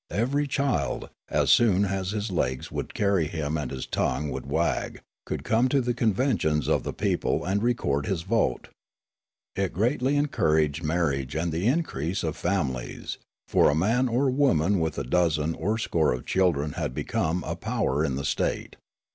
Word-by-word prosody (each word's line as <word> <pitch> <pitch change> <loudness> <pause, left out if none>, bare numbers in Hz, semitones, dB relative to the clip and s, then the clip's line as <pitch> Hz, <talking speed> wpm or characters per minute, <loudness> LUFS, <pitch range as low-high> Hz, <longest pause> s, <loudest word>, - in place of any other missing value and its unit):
Eviery 140 +7 0
child, 130 - -1 0.2
as - - +2
soon 100 -4 +5
as 95 -1 -2
his 105 0 -3
legs 65 -7 -1
would - - -5
carry 100 -6 +2
him 80 -1 -3
and 75 -5 -2
his 65 - -5
tongue 70 +3 -1
would 65 0 -5
wag, - - -1 0.3
could - - -3
come 115 +3 +2
to 140 - +3
the 125 -1 0
conventions 110 - +1
of - - +2
the - - -4
people - - -1
and 100 +3 0
record 90 - 0
his 90 -4 -1
vote. 95 - 0 0.9
It 95 -1 -1
greatly 125 - +1
encouraged 80 - +1
marriage 75 -5 -1
and 85 +2 -1
the 85 +6 0
increase 120 - -1
of 80 -2 -2
fami 85 -8 0
lies, 60 -1 -6 0.3
for - - +4
a 70 - +1
man 115 +10 +2
or 130 +3 +1
woman 105 - +2
with 80 -2 -1
a - - -1
dozen 80 +2 +1
or 105 +8 -1
score 80 - +1
of 60 - -5
children 80 -6 +1
had 65 - -4
become 85 +3 -1
a - - -3
power 70 +3 -1
in 70 -5 0
the 70 +1 -3
state. - - -2
90 Hz, 175 wpm, -26 LUFS, 75-115 Hz, 0.9 s, soon